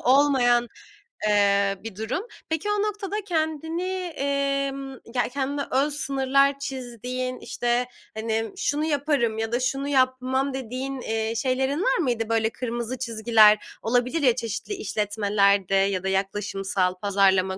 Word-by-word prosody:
olmayan, 250 -3 +4 0.6
eee, 200 -1 +3
bir 225 -3 -7
durum. 230 - -3 0.2
Peki 320 +5 -1
o 415 -1 +1
noktada 415 -1 -2
kendini, 320 -1 -1 0.3
emm 275 -1 -1 0.2
ya, 245 - +1
kendine 280 +1 -1
öz 280 +3 +2
sınırlar 275 0 +2
çizdiğin, 255 -1 -4
işte, 240 +1 -1 0.3
hani, 220 0 -2
şunu 295 +2 0
yaparım 285 -7 +1
ya 225 0 -2
da 240 - +1
şunu 270 +2 -1
yapmam 260 0 +1
dediğin, 265 +1 -4
eee, 220 0 -1
şeylerin 265 +5 0
var - - +2
mıydı 240 -8 0
böyle 225 -1 +2
kırmızı 240 +1 -4
çizgiler 220 -3 +4
olabilir 250 +7 +1
ya, 250 -5 +4
çeşitli 235 - -4
işletmelerde 205 - +1
ya 195 -1 +2
da - - -2
yaklaşımsal 195 -1 -1
pazarlama 190 -1 +2
250 Hz, 130 wpm, -25 LUFS, 220-275 Hz, 0.6 s, olmayan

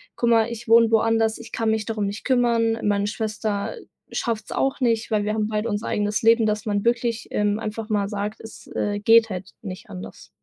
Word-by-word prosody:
guck 235 - +1
mal, 225 0 +4
ich 235 0 -7
wohne 230 0 +6
woanders. 225 0 +2
Ich - - -11
kann 225 -1 -1
mich 220 -1 0
darum 215 -3 -2
nicht 200 +2 -6
kümmern, 235 -3 +2
meine 205 0 +1
Schwester 210 - -2 0.4
schafft's 220 -3 -3
auch 270 +2 0
nicht, 230 -3 0
weil 210 -1 +2
wir 210 +1 -1
haben 215 -1 0
beide 215 +1 -2
unser 205 +2 -2
eigenes 210 +1 -1
Leben”, 225 -1 +5
dass 210 -1 -1
man 205 -2 0
wirklich, 235 -1 0
ähm, 210 +1 0
einfach 220 0 -5
mal 205 -2 0
sagt: 210 +1 -4
„Es, 220 - -11
äh, 205 0 -1
geht 225 +1 +5
halt 190 -1 -6
nicht 185 -4 -8
anders.” 90 +1 -9
220 Hz, 205 wpm, -23 LUFS, 205-230 Hz, 0.4 s, wohne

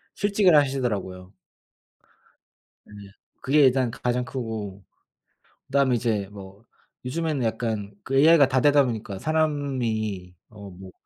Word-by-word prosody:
실직을 200 -4 +3
하시더라고요. 105 -10 -1 1.5
네. - - -17 0.5
그게 150 +3 +3
일단 130 -2 +2
가장 125 +1 -2
크고 110 -6 -6 0.8
그다음에 135 -2 +2
이제 110 -4 -1
뭐 100 +2 -13 0.4
요즘에는 150 0 -2
약간 110 -3 -3
그 135 - -3
AI가 155 0 +6
다 130 -1 +1
되다 145 0 +5
보니까 110 -5 -5
사람이 125 - -2
어 100 -2 -11
뭐 95 +1 -12
125 Hz, 250 characters per minute, -24 LUFS, 105-140 Hz, 1.5 s, AI가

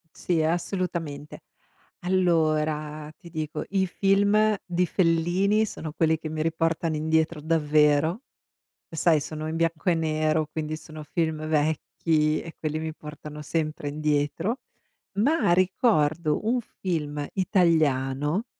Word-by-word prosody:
Sì, 170 -3 0
ehm, 160 +1 +2
assolutamente. 170 -5 -4 0.6
Allora, 155 -4 +1
ti 170 - -13
dico, 155 -2 -4
i 190 -1 +1
film 205 +3 +3
di 180 0 +1
Fellini 180 +5 +2
sono 160 -6 -6
quelli 160 0 +2
che 155 0 -6
mi 155 0 -3
riportano 165 0 0
indietro, 160 +1 +1
davvero. 155 - +2 0.7
Sai, 160 -1 +3
sono 155 +1 -5
in 160 - -3
bianco 165 +2 0
e - - +4
nero, 155 -1 +1
quindi 155 -1 -3
sono 155 -1 -10
film 155 0 -2
vecchi 155 0 +1
e 165 - -9
quelli 155 0 -2
mi 160 0 -4
portano 150 0 -9
sempre 155 -1 -2
indietro, 150 - -1 0.5
ma 225 - +2
ricordo 170 -4 +2
un 245 +2 +2
film 150 -9 -3
italiano, 160 - +2
160 Hz, 125 wpm, -26 LUFS, 155-175 Hz, 0.7 s, e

